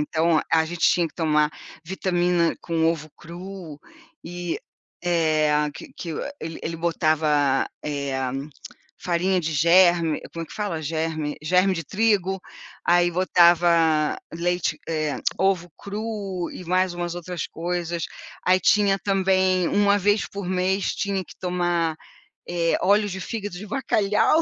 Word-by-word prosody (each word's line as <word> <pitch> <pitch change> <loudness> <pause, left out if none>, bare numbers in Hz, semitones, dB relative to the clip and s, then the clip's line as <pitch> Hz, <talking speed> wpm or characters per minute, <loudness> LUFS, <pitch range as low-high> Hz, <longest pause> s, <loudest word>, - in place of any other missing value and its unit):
Então, 160 0 +2
a 160 -1 +5
gente 170 +1 -6
tinha 175 -1 +2
que - - -26
tomar 150 -2 +2 0.3
vitamina 175 -1 +1
com 165 -1 -1
ovo 160 -2 -1
cru 175 -2 -9 0.5
e 175 0 -4 0.4
é, 160 -3 +2 0.2
que - - -11
que 170 - -6 0.3
ele 160 0 -6
ele 165 +1 -3
botava, 155 -4 +2 0.2
eh, 140 -3 -2 0.7
farinha 180 +1 +1
de 160 -1 -2
germe 170 +1 +4
como 165 - -5
é - - -16
que - - -13
fala? 200 -7 -3
Germe 155 -1 -2
germe 180 +4 +3
de 165 -2 -3
trigo, 195 -1 +1 0.5
aí 175 0 +4
botava 170 -3 +4 0.2
leite, 175 +1 -1
eh, 155 -2 -1 0.2
ovo 185 -2 +1
cru 200 -3 -4
e 185 - -8
mais 185 +1 +2
umas 175 0 -4
outras 175 -1 -5
coisas. 170 -1 -3 0.4
Aí 185 +1 +4
tinha 200 -1 +3
também, 190 -2 +2
1 205 0 +3
vez 205 +1 +2
por 200 -2 -6
mês, 185 +1 0
tinha 195 -2 -2
que - - -14
tomar, 175 -3 0 0.5
eh, 170 -1 +1
óleo 205 +2 +3
de 190 0 -5
fígado 205 -1 -5
de 210 - -8
bacalhau. 215 +4 +2
175 Hz, 140 wpm, -24 LUFS, 165-190 Hz, 0.7 s, a